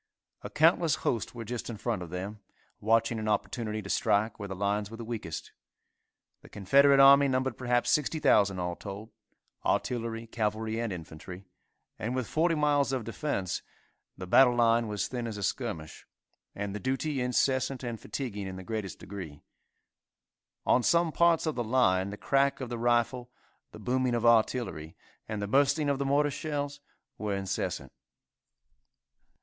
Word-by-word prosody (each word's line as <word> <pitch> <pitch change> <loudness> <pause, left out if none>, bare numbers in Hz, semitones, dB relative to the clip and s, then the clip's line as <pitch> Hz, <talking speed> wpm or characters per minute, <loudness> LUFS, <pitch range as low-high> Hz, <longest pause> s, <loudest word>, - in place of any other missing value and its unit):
A - - -7
countless 160 -1 +3
host 115 0 -1
were 115 -1 -6
just 120 +2 -5
in 115 - -5
front 110 -2 -2
of 85 - -7
them, 95 +5 -5 0.4
watching 115 +1 +2
an 110 - -4
opportunity 110 +1 -2
to 95 - -8
strike 105 +6 +1
where 100 - -5
the 95 - -5
lines 100 +1 -1
were 115 - -9
the 115 - -7
weakest. 110 -9 -5 0.9
The - - -16
Confederate 140 +8 +4
army 140 +1 +8
numbered 130 -2 0
perhaps 120 0 +1
60,000 105 - +3
all 90 -1 -2
told 100 +4 -8 0.5
artillery, 115 -2 -1
cavalry 110 0 -2
and 115 -2 -2
infantry, 90 +2 -8 0.5
and 120 +4 -2
with 130 -2 -1
40 165 +5 +1
miles 145 -2 +2
of 130 -3 -1
defence, 110 - -3 0.6
the 90 - -6
battle 125 +6 +5
line 115 -1 +3
was 105 -1 -2
thin 120 -2 -4
as 110 -2 -5
a 100 - -5
skirmish, 80 -2 -4 0.5
and 100 -1 -4
the 105 - -4
duty 135 +2 -1
incessant 130 +1 0
and 120 -2 -4
fatiguing 105 -8 -5
in 95 - -6
the 95 - -8
greatest 110 -1 -4
degree. 90 -7 -9 1.2
On 125 - +4
some 170 +5 +3
parts 170 0 +3
of 155 - 0
the 120 - -2
line 105 -6 +2
the 105 - -7
crack 140 +3 +1
of 130 -3 -5
the 120 -1 -4
rifle, 120 +1 +1 0.4
the - - -11
booming 125 -1 0
of 120 0 -1
artillery, 115 -8 +2 0.3
and 105 -1 -3
the - - -2
bursting 140 +5 +3
of 140 -1 0
the 140 - -1
mortar 145 +2 +2
shells 145 -1 -4 0.4
were 105 -2 -1
incessant. 95 -1 -3
115 Hz, 165 wpm, -29 LUFS, 100-135 Hz, 1.2 s, army